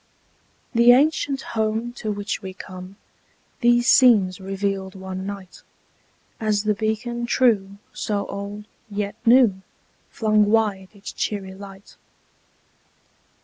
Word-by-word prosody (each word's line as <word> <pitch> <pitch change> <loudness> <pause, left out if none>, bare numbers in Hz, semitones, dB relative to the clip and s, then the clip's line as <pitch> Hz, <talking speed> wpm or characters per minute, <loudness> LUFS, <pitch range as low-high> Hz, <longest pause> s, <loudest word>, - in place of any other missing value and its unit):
The 235 +1 +7
ancient 280 0 +2
home 220 +2 -1
to 215 - -3
which 205 0 -3
we 190 -2 -8
come 185 0 -10 0.6
These 240 -1 +3
scenes 210 -9 +5
revealed 195 0 -3
one 190 0 -6
night; 190 -3 -8 0.8
As 215 -2 0
the 210 0 +2
beacon 230 +3 -2
true, 205 -6 +2 0.2
so 205 -2 -2
old, 200 +1 -6 0.2
yet 205 0 -3
new, 230 -6 +5 0.5
Flung 215 -2 +2
wide 205 -3 +1
its 200 0 -9
cheery 195 -3 -3
light. 195 0 -13
205 Hz, 110 wpm, -23 LUFS, 195-230 Hz, 0.8 s, The